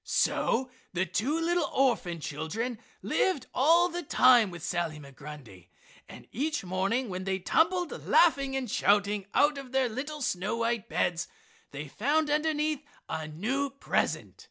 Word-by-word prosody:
So 255 Hz, +2 st, +1 dB, 0.2 s
the 185 Hz, +1 st, +1 dB
two 265 Hz, -, -1 dB
little 340 Hz, -1 st, +1 dB
orphan 235 Hz, -11 st, +1 dB
children 160 Hz, -, -4 dB, 0.2 s
lived 345 Hz, -10 st, +1 dB
all 330 Hz, +6 st, +5 dB
the 350 Hz, 0 st, -4 dB
time 250 Hz, -, +5 dB
with 170 Hz, -2 st, -9 dB
Sally 170 Hz, -3 st, -2 dB
Migrundy. 140 Hz, -, -11 dB, 0.4 s
And -, -, -11 dB
each 300 Hz, +1 st, -2 dB
morning 195 Hz, +8 st, 0 dB
when 185 Hz, 0 st, -4 dB
they 190 Hz, 0 st, -1 dB
tumbled, 345 Hz, -, +1 dB, 0.2 s
laughing 275 Hz, -5 st, +4 dB
and 265 Hz, -2 st, -2 dB
shouting, 205 Hz, -1 st, +1 dB
out 290 Hz, +1 st, +4 dB
of 265 Hz, -2 st, -11 dB
their 265 Hz, -1 st, +3 dB
little 285 Hz, +5 st, -5 dB
snow 195 Hz, +2 st, -1 dB
white 230 Hz, -2 st, -1 dB
beds, 170 Hz, -1 st, 0 dB, 0.4 s
they 150 Hz, +2 st, -7 dB
found 290 Hz, -, 0 dB
underneath 305 Hz, -1 st, 0 dB, 0.3 s
a 160 Hz, -1 st, -4 dB
new 245 Hz, -, -2 dB
present. 275 Hz, +1 st, -2 dB
240 Hz, 145 wpm, -29 LUFS, 180-290 Hz, 0.4 s, all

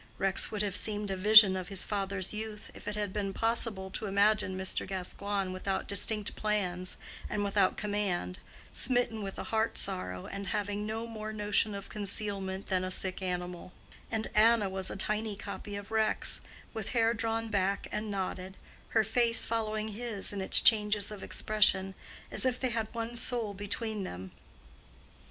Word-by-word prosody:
Rex 195 Hz, -1 st, +2 dB
would 210 Hz, -1 st, -1 dB
have 200 Hz, -3 st, -2 dB
seemed 210 Hz, -2 st, -1 dB
a -, -, -1 dB
vision 205 Hz, 0 st, +8 dB
of 185 Hz, -1 st, -4 dB
his 195 Hz, -2 st, -4 dB
father's 195 Hz, -2 st, -3 dB
youth, 215 Hz, 0 st, -6 dB
if -, -, -12 dB
it 210 Hz, -, -3 dB
had 205 Hz, -2 st, -3 dB
been 200 Hz, -2 st, -2 dB
possible 225 Hz, -4 st, +1 dB
to 215 Hz, -, -4 dB
imagine 200 Hz, -1 st, +2 dB
Mr. 190 Hz, 0 st, -2 dB
Gascoigne 195 Hz, +1 st, -2 dB
without 190 Hz, +1 st, -3 dB
distinct 205 Hz, +1 st, +2 dB
plans 185 Hz, -4 st, -2 dB, 0.3 s
and 205 Hz, -, -1 dB
without 200 Hz, -1 st, +2 dB
command, 205 Hz, -, -2 dB, 0.3 s
smitten 245 Hz, -3 st, +2 dB
with 195 Hz, -1 st, -6 dB
a -, -, -4 dB
heart 220 Hz, +1 st, +1 dB
sorrow, 90 Hz, 0 st, +1 dB
and 195 Hz, 0 st, -6 dB
having 205 Hz, +2 st, -2 dB
no 225 Hz, +1 st, -3 dB
more 215 Hz, -2 st, -6 dB
notion 210 Hz, 0 st, +1 dB
of 200 Hz, -, -7 dB
concealment 200 Hz, -2 st, -3 dB
than 185 Hz, -1 st, 0 dB
a 185 Hz, -, -3 dB
sick 185 Hz, +1 st, 0 dB
animal; 180 Hz, -1 st, -4 dB, 0.4 s
and 220 Hz, -1 st, -2 dB
Anna 215 Hz, -1 st, +4 dB
was 190 Hz, 0 st, -1 dB
a -, -, -5 dB
tiny 215 Hz, +2 st, -2 dB
copy 200 Hz, +1 st, -7 dB
of 200 Hz, +1 st, -8 dB
Rex, 220 Hz, -1 st, +2 dB, 0.3 s
with 220 Hz, -3 st, -4 dB
hair 230 Hz, 0 st, +3 dB
drawn 225 Hz, 0 st, -1 dB
back 200 Hz, -1 st, 0 dB
and 215 Hz, 0 st, -3 dB
knotted, 190 Hz, -1 st, -4 dB, 0.4 s
her 220 Hz, -, +5 dB
face 230 Hz, +2 st, +2 dB
following 215 Hz, -1 st, -2 dB
his 215 Hz, -2 st, -3 dB
in 200 Hz, -, -4 dB
its 190 Hz, -, +7 dB
changes 210 Hz, -2 st, +5 dB
of 205 Hz, -2 st, -8 dB
expression, 195 Hz, -3 st, +2 dB, 0.4 s
as -, -, +4 dB
if 255 Hz, -1 st, 0 dB
they 260 Hz, -, 0 dB
had 225 Hz, -2 st, -3 dB
one 230 Hz, 0 st, -5 dB
soul 235 Hz, -3 st, 0 dB
between 205 Hz, +1 st, -3 dB
them. 95 Hz, -, -7 dB
205 Hz, 170 wpm, -30 LUFS, 190-220 Hz, 0.4 s, vision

